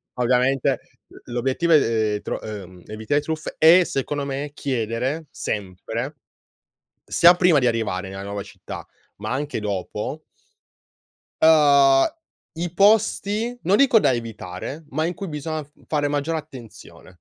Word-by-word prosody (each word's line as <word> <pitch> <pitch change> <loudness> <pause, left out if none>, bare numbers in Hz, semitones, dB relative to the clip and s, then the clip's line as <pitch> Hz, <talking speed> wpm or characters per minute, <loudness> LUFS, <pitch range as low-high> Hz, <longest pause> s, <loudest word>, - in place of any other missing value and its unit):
ovviamente. 125 +2 +2 0.5
L'obiettivo 130 +7 0
è 110 -7 +2
tro - - -3
ehm, 95 -5 -9
evitare 110 +7 -1
truffe 155 0 -5
e, 170 +3 +7
secondo 140 0 -2
me, 140 +1 -4
chiedere 130 +4 -2
sempre, 110 - -5 0.9
sia 175 +1 +6
prima 175 -5 +4
di 125 - +2
arrivare 100 -5 -1
nella 95 0 -7
nuova 100 0 -5
città, - - -9 0.3
ma 105 +3 -5
anche 140 -2 -2
dopo 105 - -4 1.2
ehm, 140 -4 +6 0.5
i 170 +1 -4
posti, 215 +3 +2
non 195 +4 +3
dico 270 -4 +5
da - - +3
evitare, 115 - -6
ma 155 +4 -1
in 175 - -2
cui 195 +1 -6
biso 150 0 -5 0.2
fare 145 -2 0
maggiore 150 +3 -1
attenzione. 120 - -13
140 Hz, 125 wpm, -23 LUFS, 110-160 Hz, 1.2 s, e